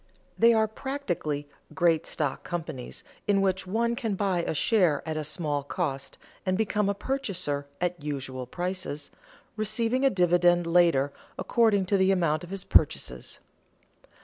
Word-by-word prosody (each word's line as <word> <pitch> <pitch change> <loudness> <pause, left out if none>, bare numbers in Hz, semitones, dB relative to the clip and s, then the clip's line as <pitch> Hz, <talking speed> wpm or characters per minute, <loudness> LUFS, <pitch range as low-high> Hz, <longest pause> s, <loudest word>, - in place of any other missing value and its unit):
They 230 +1 +6
are 220 -1 +3
practically 200 - -3 0.3
great 170 -3 +2
stock 145 -4 -2
companies 155 -8 -5 0.2
in 200 -1 +3
which 190 -1 0
one 235 +4 0
can 225 -4 -2
buy 190 -3 0
a 165 - -2
share 175 -5 +2
at 160 - -2
a 155 - -2
small 150 -1 -2
cost 135 0 -4 0.3
and 185 -1 0
become 210 -1 +1
a 200 - 0
purchaser 185 - -2
at 175 -2 -2
usual 135 -3 -4
prices, 180 -1 -4 0.4
receiving 225 +4 0
a 275 - +6
dividend 175 -3 +3
later 165 -5 +3 0.2
according 220 -5 +2
to 200 +2 +2
the 190 0 +3
amount 170 -4 +2
of 175 - -9
his 195 -1 -4
purchases. - - +1
180 Hz, 150 wpm, -27 LUFS, 155-205 Hz, 0.4 s, They